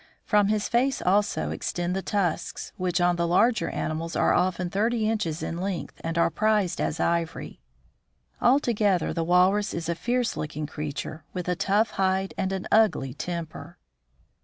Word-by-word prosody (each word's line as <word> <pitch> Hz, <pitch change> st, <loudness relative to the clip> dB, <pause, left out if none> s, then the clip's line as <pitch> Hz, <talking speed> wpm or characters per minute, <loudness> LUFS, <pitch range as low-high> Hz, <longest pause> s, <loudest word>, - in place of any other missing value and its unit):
From 210 Hz, -2 st, +3 dB
his 210 Hz, 0 st, 0 dB
face 255 Hz, +3 st, +1 dB
also 200 Hz, +3 st, +1 dB
extend 175 Hz, +1 st, -2 dB
the 195 Hz, -, -1 dB
tusks, 195 Hz, -5 st, -2 dB
which 180 Hz, -3 st, -1 dB
on 175 Hz, 0 st, +2 dB
the 170 Hz, 0 st, +1 dB
larger 205 Hz, +2 st, +3 dB
animals 165 Hz, +1 st, -3 dB
are -, -, +3 dB
often 180 Hz, -1 st, +1 dB
thirty 220 Hz, +2 st, +1 dB
inches 195 Hz, -8 st, -1 dB
in 170 Hz, -, -4 dB
length, 190 Hz, -2 st, -4 dB
and 165 Hz, +1 st, -3 dB
are 170 Hz, -, +3 dB
prized 210 Hz, 0 st, +1 dB
as 155 Hz, -, -1 dB
ivory. 170 Hz, -, -1 dB, 0.8 s
Altogether 220 Hz, -, +2 dB
the 165 Hz, -, -1 dB
walrus 185 Hz, +4 st, +3 dB
is 170 Hz, -1 st, -4 dB
a -, -, +2 dB
fierce 240 Hz, +8 st, -1 dB
looking 150 Hz, 0 st, -4 dB
creature, 150 Hz, +1 st, -5 dB
with 180 Hz, -1 st, -4 dB
a 180 Hz, -, +1 dB
tough 205 Hz, +4 st, +1 dB
hide 190 Hz, 0 st, 0 dB
and 190 Hz, -1 st, -1 dB
an 190 Hz, -1 st, -3 dB
ugly 210 Hz, -, +3 dB
temper. 170 Hz, 0 st, -6 dB
185 Hz, 160 wpm, -26 LUFS, 170-210 Hz, 0.8 s, From